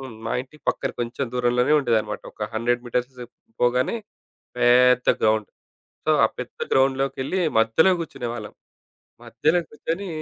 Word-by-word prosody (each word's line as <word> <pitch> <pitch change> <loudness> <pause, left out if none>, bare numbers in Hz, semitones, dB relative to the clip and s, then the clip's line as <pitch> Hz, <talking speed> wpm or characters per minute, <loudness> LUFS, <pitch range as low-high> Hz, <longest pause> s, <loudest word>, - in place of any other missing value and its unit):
హ్మ్. 130 -3 -8
మా - - -2
ఇంటి 140 +4 -18
పక్కన 135 - 0
కొంచెం 120 +3 -3
దూరంలోనే 125 +3 +2
ఉండేదన్నమాట. 115 -5 -1
ఒక 105 -1 -5
100 120 +2 0
మీటర్స్ 125 +2 -2 0.5
పోగానే 125 - +2 0.6
పెద్ద 125 +1 +5
గ్రౌండ్. 110 -1 +2 0.6
సో - - 0 0.2
ఆ - - +3
పెద్ద - - -8
గ్రౌండ్‌లోకెళ్లి 135 +5 +1 0.2
మధ్యలో 115 +12 +4
గూర్చునేవాళ్ళం. 120 -8 -6 0.7
మధ్యలో 160 +4 +1
గూర్చొని 165 +6 -4
125 Hz, 125 wpm, -23 LUFS, 120-135 Hz, 0.7 s, పెద్ద